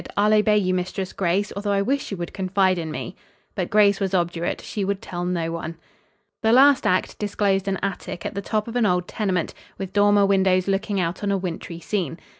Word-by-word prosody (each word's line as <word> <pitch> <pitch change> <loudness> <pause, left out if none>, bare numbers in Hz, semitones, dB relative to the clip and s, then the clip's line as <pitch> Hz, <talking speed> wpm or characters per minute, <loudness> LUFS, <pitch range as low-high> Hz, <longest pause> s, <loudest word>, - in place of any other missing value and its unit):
"I'll 210 +1 +4
obey 210 0 +4
you 185 -3 +1
Mistress 185 +1 -3
Grace, 195 +2 0
although 200 0 -1
I 200 0 +2
wish 275 +6 -1
you 195 - -4
would 175 -1 -5
confide 190 -1 +1
in 160 -1 -4
me." 180 +4 -6 0.4
But 185 -3 -3
Grace 205 -1 +4
was 195 -1 0
obdurate. 170 -1 -1
She 205 - -4
would 195 0 -1
tell 175 -2 -5
no 170 -2 -1
one. 165 0 -5 0.6
The 220 - +3
last 275 +3 +6
act 185 - 0
disclosed 200 -2 0
an 195 -1 0
attic 190 -2 -4
at - - -3
the 200 - -3
top 215 +2 -2
of 230 - -7
an 240 -3 +3
old 180 -1 +1
tenement, 185 -6 -1 0.2
with 190 -1 -6
dormer 205 0 +4
windows 190 -1 +2
looking 195 +1 0
out 175 +2 -2
on 205 - 0
a 200 - +2
wintry 175 -2 -5
scene. 170 -4 -2
195 Hz, 215 wpm, -23 LUFS, 180-205 Hz, 0.6 s, last